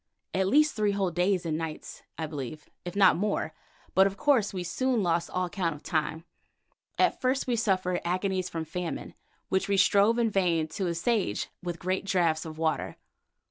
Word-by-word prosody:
At 190 0 +1
least 300 +7 +4
three 210 -2 +1
whole 195 -3 0
days 180 +1 +1
and 160 -1 -1
nights, 160 -2 -6 0.2
I 160 - -2
believe, 150 0 -6 0.2
if 175 +1 -6
not 195 -2 +6
more, 205 +3 -1 0.4
but 190 +1 +6
of 195 0 -5
course 250 -7 +3
we 185 -2 -4
soon 245 +5 0
lost 170 -1 +1
all 185 0 -1
count 175 -3 -2
of 150 - -14
time. 155 -1 -1 0.7
At 365 - +2
first 260 +1 +1
we 245 - +1
suffered 185 -5 +1
agonies 185 +1 -1
from 165 -1 -4
famine, 170 +2 -5 0.4
which 190 - +1
we 200 - +2
strove 200 +3 +4
in 230 -2 +2
vain 170 -5 +2
to 185 +3 -2
assuage 175 - 0
with 175 -1 -4
great 185 +1 -1
draughts 175 -5 +1
of 155 -1 -7
water. 160 -1 -1
185 Hz, 180 wpm, -28 LUFS, 165-200 Hz, 0.7 s, not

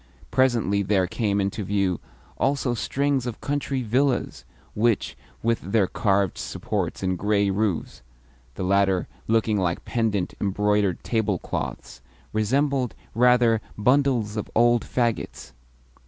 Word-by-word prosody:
Presently 120 -6 +2
there 95 -1 +2
came 100 +2 -1
into 100 +2 -1
view 95 -2 0 0.4
also 135 -1 +1
strings 135 +1 0
of 120 - -5
country 140 -2 -2
villas 125 +3 0 0.3
which, 115 0 +1 0.3
with 115 0 +1
their 100 +2 +2
carved 100 -1 0
supports - - -3
and 95 0 +1
grey 100 -1 +2
roofs 100 - -2 0.5
(the - - -4
latter 95 -1 +2 0.2
looking 110 -2 +2
like 85 -2 -1
pendent, 110 -6 -1
embroidered 105 -1 +1
tablecloths), 105 - -3 0.3
resembled, 130 +4 +1 0.2
rather, 120 -1 +4 0.2
bundles 125 -2 +2
of 105 - -4
old 120 0 +4
faggots. 115 - -2
110 Hz, 115 wpm, -24 LUFS, 100-120 Hz, 0.5 s, rather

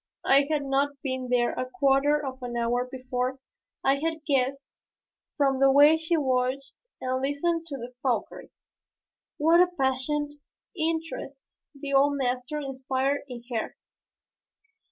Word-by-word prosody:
I 280 +1 +5
had 300 -2 0
not 275 +1 0
been 260 -2 -3
there 245 -1 +2
a 255 - -4
quarter 275 +3 +3
of 260 -1 -6
an 240 -1 -4
hour 245 +2 0
before 255 0 -3 0.5
I 270 +1 +3
had 320 0 -3
guessed 275 -1 -1 0.6
from 275 -3 +2
the 275 0 +6
way 295 +3 +6
she 325 +1 +1
watched 265 - -1
and 255 0 -2
listened 330 +5 -1
to 250 -5 -7
Fauchery 255 -3 -2 0.9
what 325 +3 +5
a 360 - +5
passionate 275 +3 0 0.4
interest 320 -4 -4 0.3
the 280 0 -4
old 280 +1 +4
master 250 +2 -2
inspired 270 0 -1
in 245 -3 -8
her. 225 - -3
270 Hz, 135 wpm, -27 LUFS, 255-290 Hz, 0.9 s, the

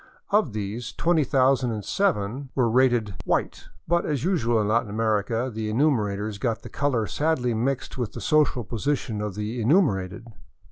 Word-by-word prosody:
Of 200 - +2
these, 110 +3 -4
20,007 135 - +1
were 125 -3 +3
rated 120 -3 +2
" - - -9
white," - - -1 0.2
but 170 0 +2
as 145 -4 -2
usual 120 -11 +1
in 105 - 0
Latin 115 +1 +1
America 110 +3 0
the 110 0 -3
enumerators 105 -5 0
got 115 0 -2
the - - -8
color 135 -6 0
sadly 135 -1 0
mixed 130 +3 -2
with 120 -4 -3
the - - -6
social 150 -5 +2
position 115 0 -2
of 105 -3 -4
the 105 +3 -3
enumerated. 110 - +1
120 Hz, 150 wpm, -25 LUFS, 105-140 Hz, 0.2 s, were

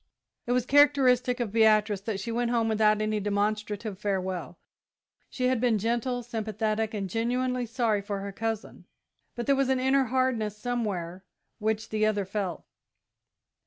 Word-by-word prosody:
It - - -1
was 250 -1 +1
characteristic 255 -3 +4
of 235 -4 -2
Beatrice 215 -2 +3
that 205 -1 -3
she 230 +4 -4
went 240 +1 0
home 230 -2 +1
without 215 -1 +3
any 215 0 0
demonstrative 210 0 -2
farewell. 185 -5 -3 0.7
She 250 -1 -1
had 255 -2 +1
been 240 -3 +3
gentle, 240 +3 -1
sympathetic, 220 -1 -2
and 200 -2 -2
genuinely 245 +4 -1
sorry 225 -3 0
for 200 0 -4
her 200 0 -5
cousin, 225 +1 -4 0.5
but 240 - -4
there 280 - +3
was 270 -1 +1
an 260 -1 +2
inner 265 +1 +3
hardness 240 -4 0
somewhere 200 -7 -3 0.4
which 220 0 -1
the 215 0 +1
other 205 -2 0
felt. 190 -2 -3
220 Hz, 155 wpm, -27 LUFS, 210-245 Hz, 0.7 s, characteristic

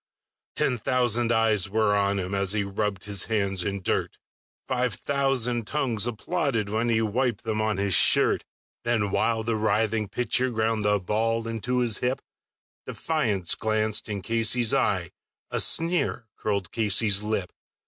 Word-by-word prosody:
Ten 125 - 0
thousand 120 0 +1
eyes 110 -3 +3
were 105 0 +2
on 100 0 +1
him 95 0 -4
as 100 0 +1
he 105 -1 0
rubbed 100 0 -3
his 100 -2 -2
hands 100 -4 -1
with 100 -1 -4
dirt, - - -1 0.5
Five 125 -4 -1
thousand 125 -4 -1
tongues 120 -7 +1
applauded 115 -1 -2
when 110 +3 0
he 115 -1 +2
wiped 120 +1 -1
them 110 -1 -2
on 110 -2 0
his 100 -1 0
shirt; - - +4 0.4
Then, 110 -4 0
while 115 +1 0
the 115 0 -1
writhing 110 0 0
pitcher 125 +4 0
ground 110 -1 0
the 105 0 +2
ball 115 +4 -1
into 115 +2 -2
his 115 -4 +2
hip, 125 +2 -1 0.7
Defiance 110 - -1
glanced 110 0 0
in 100 -3 -4
Casey's 115 +1 +2
eye, - - 0 0.4
a - - -1
sneer 165 -8 +1
curled 100 -4 -3
Casey's 105 -2 +2
lip. 105 -4 -3
110 Hz, 150 wpm, -25 LUFS, 100-120 Hz, 0.7 s, shirt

